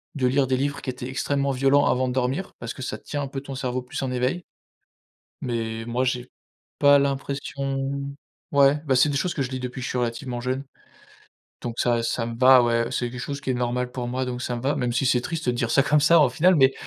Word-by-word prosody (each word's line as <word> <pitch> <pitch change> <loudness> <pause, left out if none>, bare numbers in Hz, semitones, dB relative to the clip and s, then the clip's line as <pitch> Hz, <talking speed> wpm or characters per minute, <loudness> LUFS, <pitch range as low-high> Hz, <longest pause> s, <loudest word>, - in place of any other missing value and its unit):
de 130 -3 +1
lire 135 +2 +2
des 130 0 +1
livres 140 +1 -2
qui 130 - -5
étaient 125 0 -5
extrêmement 140 +1 0
violents 135 +2 +3
avant 130 0 +2
de 125 - -2
dormir, 130 +8 -1
parce 115 0 -5
que - - -10
ça - - -4
tient 145 - -5
un - - -3
peu 135 0 -5
ton 135 -1 -7
cerveau 130 -1 -2
plus 125 +3 -6
en 130 - -2
éveil. 125 +8 -1 1.0
Mais 115 -2 -3
moi 120 +2 0
j'ai 125 0 -2 0.5
pas 145 0 +6
l'impression 140 0 -2 0.6
ouais 140 +1 +5
bah, 135 -2 +3
c'est 130 +4 +5
des 140 - -1
choses 175 +5 0
que 140 - -1
je 130 - -4
lis, 130 -1 -4
depuis 125 0 -5
que - - -5
je - - -3
suis 125 - -2
relativement 120 +1 -3
jeune, 130 +2 -2 1.0
donc 120 -1 -4
ça 120 -1 +2
ça 115 0 -1
me 115 0 -5
va 130 0 +7
ouais, 115 0 +1
c'est 120 -1 -1
quelque 125 - -8
chose 140 0 -4
qui 135 - -3
est - - +1
normal 125 0 -1
pour 125 -2 -4
moi 130 +1 -1
donc 125 -1 -4
ça 125 - -2
me 120 - -6
va 140 +2 0
même 120 -1 -1
si 125 +2 +1
c'est 125 -2 +3
triste 165 0 -4
de 125 - +2
dire 120 -1 -1
ça 135 - +5
comme 150 +2 +3
ça 160 +3 +6
au 145 - +5
final, 180 +9 +4
mais 135 -1 +5
130 Hz, 255 wpm, -24 LUFS, 125-140 Hz, 1.0 s, va